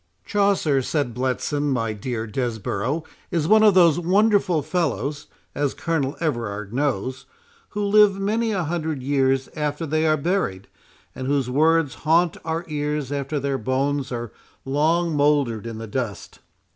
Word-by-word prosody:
"Chaucer," 200 Hz, -9 st, +2 dB
said 140 Hz, -2 st, -1 dB
Bletson, 130 Hz, +4 st, -1 dB
"my 115 Hz, -4 st, 0 dB
dear 110 Hz, +2 st, -4 dB
Desborough, 115 Hz, +4 st, -2 dB, 0.3 s
is 160 Hz, -3 st, 0 dB
one 215 Hz, +2 st, +6 dB
of 210 Hz, -3 st, +6 dB
those 170 Hz, -3 st, +5 dB
wonderful 190 Hz, -2 st, +2 dB
fellows, 145 Hz, -, -2 dB, 0.3 s
as 145 Hz, -1 st, -1 dB
Colonel 155 Hz, -4 st, -1 dB
Everard 110 Hz, -9 st, -3 dB
knows, 130 Hz, -2 st, -2 dB, 0.4 s
who 210 Hz, 0 st, -3 dB
live 200 Hz, -1 st, +5 dB
many 220 Hz, +3 st, 0 dB
a 190 Hz, -4 st, 0 dB
hundred 160 Hz, -4 st, -3 dB
years 135 Hz, -1 st, +1 dB
after 150 Hz, +1 st, -2 dB
they 155 Hz, +1 st, +1 dB
are 155 Hz, 0 st, +3 dB
buried, 140 Hz, -, -1 dB, 0.5 s
and 130 Hz, -, -5 dB
whose 135 Hz, -3 st, 0 dB
words 160 Hz, +1 st, +3 dB
haunt 165 Hz, +2 st, +3 dB
our 165 Hz, +1 st, -3 dB
ears 150 Hz, -2 st, -2 dB
after 145 Hz, +1 st, -2 dB
their 140 Hz, -1 st, -1 dB
bones 135 Hz, +3 st, -1 dB
are 120 Hz, -2 st, -4 dB, 0.3 s
long 160 Hz, +4 st, +1 dB
mouldered 145 Hz, -7 st, +1 dB
in 115 Hz, -1 st, -6 dB
the 115 Hz, -, -6 dB
dust." 110 Hz, -4 st, -5 dB
145 Hz, 145 wpm, -23 LUFS, 130-165 Hz, 0.5 s, one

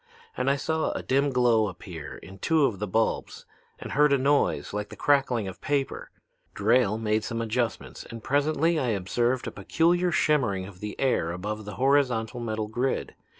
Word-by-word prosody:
And -, -, 0 dB
I 140 Hz, -, +3 dB
saw 160 Hz, +3 st, -1 dB
a -, -, -4 dB
dim 140 Hz, +2 st, +2 dB
glow 120 Hz, -4 st, +3 dB
appear 85 Hz, -5 st, -8 dB
in 95 Hz, +2 st, -12 dB
two 160 Hz, -, +3 dB
of 105 Hz, -8 st, -1 dB
the 105 Hz, -, -2 dB
bulbs 110 Hz, +4 st, -1 dB, 0.3 s
and -, -, -8 dB
heard 150 Hz, +1 st, +4 dB
a 140 Hz, -, +5 dB
noise 140 Hz, -3 st, +1 dB
like 105 Hz, 0 st, -3 dB
the -, -, -9 dB
crackling 135 Hz, -7 st, +2 dB
of 95 Hz, -, -8 dB
paper. 140 Hz, -1 st, -2 dB, 0.5 s
Drayle 110 Hz, 0 st, +3 dB
made 110 Hz, -1 st, 0 dB
some 115 Hz, 0 st, -3 dB
adjustments, 115 Hz, 0 st, -2 dB
and 115 Hz, -2 st, -9 dB
presently 155 Hz, +4 st, +1 dB
I 130 Hz, -, 0 dB
observed 120 Hz, +5 st, 0 dB
a -, -, -4 dB
peculiar 175 Hz, +2 st, +1 dB
shimmering 120 Hz, -, +1 dB
of 95 Hz, -2 st, -12 dB
the 105 Hz, +1 st, -6 dB
air 125 Hz, -11 st, +1 dB
above 105 Hz, +4 st, -5 dB
a -, -, -4 dB
horizontal 125 Hz, -3 st, +1 dB
metal 110 Hz, -2 st, -3 dB
grid. 120 Hz, +5 st, -2 dB
120 Hz, 180 wpm, -27 LUFS, 105-140 Hz, 0.5 s, a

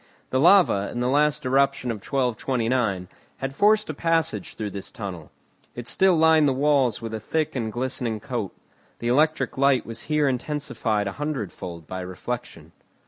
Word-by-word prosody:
The 130 Hz, -, +2 dB
lava, 170 Hz, -, +5 dB
in -, -, -4 dB
the 125 Hz, -, 0 dB
last 150 Hz, +2 st, +2 dB
eruption 135 Hz, -1 st, +2 dB
of 115 Hz, -, -4 dB
1229, 120 Hz, -5 st, -1 dB, 0.3 s
had 135 Hz, 0 st, -4 dB
forced 210 Hz, +7 st, +3 dB
a 155 Hz, -, -3 dB
passage 165 Hz, -, 0 dB
through 105 Hz, -2 st, -4 dB
this 100 Hz, 0 st, -6 dB
tunnel. 95 Hz, -7 st, -7 dB, 0.5 s
It 120 Hz, 0 st, -7 dB
still 190 Hz, -2 st, +3 dB
lined 160 Hz, -2 st, +5 dB
the 135 Hz, -, +2 dB
walls 135 Hz, -4 st, +2 dB
with 115 Hz, -1 st, -5 dB
a 110 Hz, -, -3 dB
thick 155 Hz, +8 st, -2 dB
and 115 Hz, -4 st, -2 dB
glistening 120 Hz, -2 st, -2 dB
coat. -, -, -4 dB, 0.5 s
The 120 Hz, -, -2 dB
electric 140 Hz, -1 st, +1 dB
light 140 Hz, -2 st, +3 dB
was 115 Hz, -, -6 dB
here 150 Hz, -1 st, +2 dB
intensified 125 Hz, -5 st, -1 dB
a 100 Hz, -, -2 dB
hundredfold 95 Hz, -, -5 dB
by 95 Hz, +4 st, -6 dB
reflection. 90 Hz, -3 st, -6 dB
125 Hz, 165 wpm, -24 LUFS, 110-150 Hz, 0.5 s, lava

